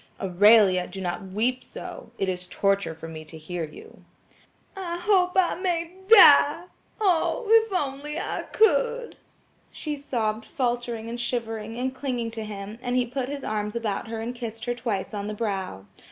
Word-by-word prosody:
"Aurelia, 195 0 +5
do 190 +2 -8
not 180 +1 -4
weep 235 +7 -1
so. - - -9
It 195 - -1
is 180 -1 -3
torture 195 -3 0
for 160 +1 -9
me 160 -1 -8
to 160 - -11
hear 165 +1 -4
you." 150 - -14 0.7
"I 350 -3 -4
hope 360 0 +3
I 375 -2 +3
may 345 -2 -2
die! 325 -6 +8 0.4
Oh, 390 +3 +1
if 450 0 +5
I 365 -6 +1
only 285 +3 -5 0.3
could!" 480 +2 +2 0.5
she 300 -1 -4
sobbed 225 -6 -2
faltering 240 -2 -2
and 235 +1 -5
shivering, 225 -2 -3
and 260 +1 -2
clinging 250 -4 -3
to 225 -1 -5
him, 210 +1 -7
and 245 -1 -2
he 250 -1 +2
put 255 +1 -4
his 285 -1 -5
arms 210 0 -3
about 225 -1 -2
her 225 0 -5
and 230 +2 -4
kissed 230 -2 -7
her 240 - 0
twice 230 -6 -3
on 205 -1 -4
the 210 - -4
brow. 195 - -3
235 Hz, 170 wpm, -25 LUFS, 205-290 Hz, 0.7 s, die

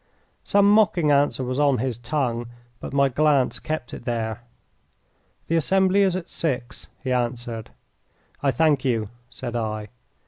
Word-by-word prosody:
Some 200 0 +4
mocking 185 -7 +4
answer 140 -2 +2
was 130 +2 -2
on 140 -3 +3
his 120 -1 -2
tongue, 120 -2 -2 0.3
but - - -7
my 140 0 +3
glance 140 0 +2
kept 155 -5 -4
it - - -7
there. 115 -2 -3 1.0
"The 165 - +1
assembly 190 +4 +3
is 190 -2 +3
at 185 -2 -4
six," 130 -7 -3 0.2
he 130 - -2
answered. 120 -2 -3 0.7
"I 140 - +2
thank 145 +1 +2
you," 115 -6 0 0.2
said 120 -2 -6
I. 110 -2 -3
130 Hz, 145 wpm, -24 LUFS, 120-155 Hz, 1.0 s, Some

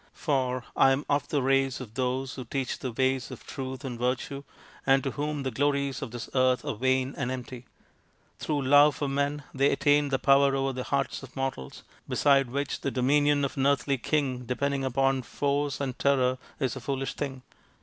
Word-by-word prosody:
For 130 -5 0
I 135 - +6
am 140 +2 -2
of 145 0 +1
the 145 -3 0
race 135 -1 +2
of 120 -5 -9
those 130 +1 -1
who 130 - -6
teach 130 +2 -3
the 130 - -4
ways 130 +2 0
of - - -10
Truth 130 0 -6
and 120 -3 -5
Virtue 125 +3 -2 0.4
and 135 -1 +3
to 135 - -1
whom 150 0 -3
the 130 - -2
glories 140 +1 0
of 135 - -4
this 120 0 -6
earth 130 -1 +2
are - - -1
vain 130 +3 +1
and 125 - -1
empty. 125 -1 -6 0.7
Through 145 -2 -1
love 145 +2 +6
for 145 - -2
men 140 +1 -1
they 140 +1 +3
attain 145 0 +3
to 135 - +1
power 140 0 +4
over 135 0 0
the 125 0 -4
hearts 140 -2 -1
of 135 -2 -12
mortals, 135 - -4 0.3
beside 135 -3 +3
which 140 +2 -3
the - - -1
dominion 145 +2 +2
of 140 - -5
an 135 0 +2
earthly 140 -1 +1
<king 130 -2 -1
de 125 +1 -2
pending 140 0 -1
upon 135 +1 +1
force 140 +2 -1
and 130 -3 -3
terror 130 -2 +2 0.2
is 130 -3 -1
a 130 - -7
foolish 135 +1 -3
thing. 135 -3 -5
135 Hz, 200 wpm, -28 LUFS, 130-140 Hz, 0.7 s, I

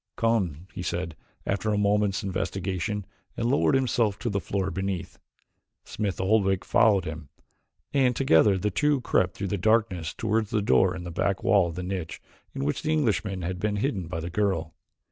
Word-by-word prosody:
"Come," 95 -9 0
he - - -5
said 85 -2 -3 0.3
after 100 +2 -1
a 105 - +1
moment's 105 0 +1
investigation 95 +1 -2 0.3
and 115 - 0
lowered 140 0 +3
himself 120 -6 +1
to 110 +3 -3
the 100 - 0
floor 95 +1 -2
beneath. 95 -1 -4 0.6
Smith 105 -3 -3
Oldwick 95 -1 +2
followed 105 -6 +4
him, 80 -3 -7 0.6
and 130 -3 +3
together 100 -5 +4
the 105 +3 -1
two 145 -3 +2
crept 95 -6 +1
through 100 -1 -3
the 100 - -1
darkness 100 -5 +1
toward 110 0 0
the 110 - 0
door 90 +3 +3
in 90 - -6
the 85 - -6
back 95 +3 -1
wall 95 -3 +4
of 85 - -6
the 90 - -4
niche 90 -3 -4 0.4
in 70 - -2
which 75 - -1
the 155 - -1
Englishman 100 - 0
had 90 +1 -3
been 105 +1 0
hidden 100 - -1
by 85 -1 -4
the 85 +2 -5
girl. 90 -5 0
100 Hz, 185 wpm, -26 LUFS, 90-110 Hz, 0.6 s, followed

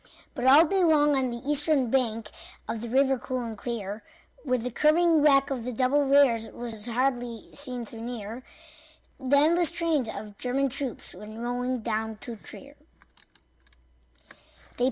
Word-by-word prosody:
But 245 - -4
all 285 +5 +7
day 380 +3 +1
long 295 -3 +4
on 260 -2 0
the 235 +2 -7
eastern 295 -4 +2
bank 230 -5 0 0.4
Of 225 - -4
the 235 - -6
river 265 +1 +2
cool 255 0 -3
and 230 -2 -5
clear, 215 -2 -5 0.4
Where 255 -2 0
the 250 +1 -4
curving 320 +4 +3
track 275 -2 +4
of 255 -4 -3
the 250 - -4
double 260 +4 +1
rails 270 -5 +3
Was 230 -2 -5
hardly 245 -2 -2
seen 255 -4 -1
though 225 0 -9
near, 230 0 -6 0.8
The 275 +1 +2
endless 335 +3 +4
trains 325 -8 0
of 205 -1 -8
German 270 +2 0
troops 265 -1 -3
Went 210 +4 -10
rolling 245 +1 -2
down 220 0 -3
to 235 - -7
Trier. - - -10
250 Hz, 155 wpm, -27 LUFS, 230-280 Hz, 0.8 s, all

